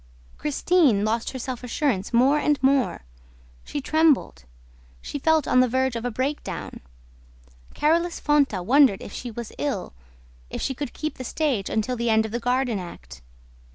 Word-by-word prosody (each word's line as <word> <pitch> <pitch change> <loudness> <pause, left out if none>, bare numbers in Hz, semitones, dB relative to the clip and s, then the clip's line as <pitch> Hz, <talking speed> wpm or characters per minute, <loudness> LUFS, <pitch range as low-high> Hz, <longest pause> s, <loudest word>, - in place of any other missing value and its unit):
Christine 295 - +2
lost 225 +1 -1
her 260 - -6
self 255 0 -5
assurance 245 -5 -1
more 260 +5 +4
and 295 -1 +2
more. 270 -1 +2 0.6
She 290 - -5
trembled. 300 - +2 0.5
She 285 - -6
felt 315 0 +2
on 255 - +4
the 255 - +5
verge 260 0 0
of 230 +1 -4
a - - 0
breakdown... 265 +5 -4 1.0
Carolus 335 +3 +1
Fonta 280 -11 +2
wondered 260 -4 +4
if - - -9
she 245 - -6
was 235 0 -7
ill, 275 -11 -3 0.6
if - - -5
she 265 - -1
could 275 0 -6
keep 310 -3 -5
the - - -4
stage 255 -6 -1
until 220 +3 -1
the 235 0 -1
end 220 0 +3
of 220 - -6
the 240 - -2
Garden 245 -2 0
Act. 170 - -10
255 Hz, 165 wpm, -24 LUFS, 230-290 Hz, 1.0 s, the